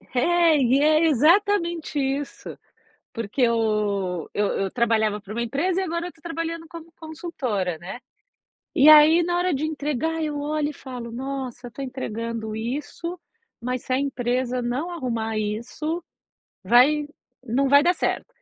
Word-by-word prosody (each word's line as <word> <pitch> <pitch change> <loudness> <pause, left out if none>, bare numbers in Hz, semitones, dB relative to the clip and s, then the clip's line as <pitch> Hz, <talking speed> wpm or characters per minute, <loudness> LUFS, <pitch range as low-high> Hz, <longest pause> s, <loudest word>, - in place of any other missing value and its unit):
É, 335 +3 +4
e 260 +1 +3
é 310 +2 +4
exatamente 335 - +2
isso, 275 +1 -3 0.6
porque 230 +2 -3
eu 210 -6 0
eu 205 0 +1 0.2
eu 190 - -3
trabalhava 220 -3 +1
para 205 0 -10
uma 235 - -1
empresa 305 +10 -1
e 380 - -1
agora 340 0 -3
eu - - -4
estou 325 -3 -17
trabalhando 330 -1 -4
como 335 -1 -10
consultora, 275 - -3
né, 190 +8 -8 0.7
e 280 +3 +6
aí 310 +3 +8
na 350 0 0
hora 360 +1 +1
de 285 +1 -1
entregar 310 +1 -2
eu 300 -2 -2
olho 300 0 -1
e - - -7
falo: 250 -4 -8
"Nossa 260 0 -5
eu - - -6
estou 275 +3 -6
entregando 230 -3 -4
isso, 290 +9 -5 0.4
mas 250 +1 -3
se 255 - -4
a 255 - +3
empresa 250 -2 -1
não 260 +9 -2
arrumar 230 -8 -3
isso, 240 +11 -3 0.6
vai 290 +5 +4 0.4
não 260 +3 +1
vai 285 +1 +6
dar 355 +2 +4
certo", - - -1
275 Hz, 155 wpm, -24 LUFS, 235-320 Hz, 0.7 s, aí